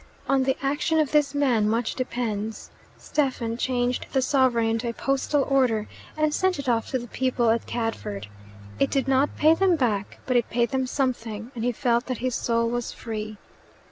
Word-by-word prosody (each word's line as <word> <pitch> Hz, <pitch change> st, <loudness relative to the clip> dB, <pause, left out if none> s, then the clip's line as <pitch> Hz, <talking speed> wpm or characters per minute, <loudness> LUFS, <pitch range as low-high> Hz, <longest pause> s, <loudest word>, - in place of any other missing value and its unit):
On 275 Hz, -1 st, +3 dB
the 265 Hz, 0 st, +1 dB
action 290 Hz, +4 st, +1 dB
of 300 Hz, -3 st, +1 dB
this 295 Hz, -2 st, +2 dB
man 245 Hz, -7 st, +2 dB
much 225 Hz, +1 st, 0 dB
depends. 225 Hz, -4 st, -3 dB, 0.3 s
Stephen 255 Hz, -6 st, -1 dB
changed 245 Hz, 0 st, -1 dB
the 265 Hz, -, +3 dB
sovereign 260 Hz, -5 st, +3 dB
into 230 Hz, +2 st, -1 dB
a -, -, -3 dB
postal 275 Hz, +3 st, 0 dB
order, 250 Hz, -6 st, +2 dB, 0.3 s
and 305 Hz, -1 st, +2 dB
sent 375 Hz, +1 st, +1 dB
it 280 Hz, -1 st, -6 dB
off 230 Hz, -2 st, +1 dB
to 260 Hz, -, 0 dB
the 240 Hz, -, -6 dB
people 245 Hz, -1 st, +1 dB
at 230 Hz, -, -1 dB
Cadford. 105 Hz, -, -3 dB, 0.5 s
It 140 Hz, -, +3 dB
did 275 Hz, -1 st, 0 dB
not 270 Hz, +2 st, +2 dB
pay 310 Hz, +1 st, +6 dB
them 370 Hz, +1 st, +3 dB
back, 215 Hz, -9 st, -1 dB
but 255 Hz, -, 0 dB
it 240 Hz, -, 0 dB
paid 235 Hz, 0 st, +1 dB
them 260 Hz, -1 st, 0 dB
something, 240 Hz, -4 st, -2 dB
and 230 Hz, -, -5 dB
he 245 Hz, -, +2 dB
felt 240 Hz, 0 st, 0 dB
that 255 Hz, -2 st, -2 dB
his 255 Hz, 0 st, -2 dB
soul 230 Hz, 0 st, +1 dB
was 240 Hz, 0 st, -2 dB
free. 215 Hz, -2 st, -6 dB
245 Hz, 190 wpm, -25 LUFS, 230-275 Hz, 0.5 s, pay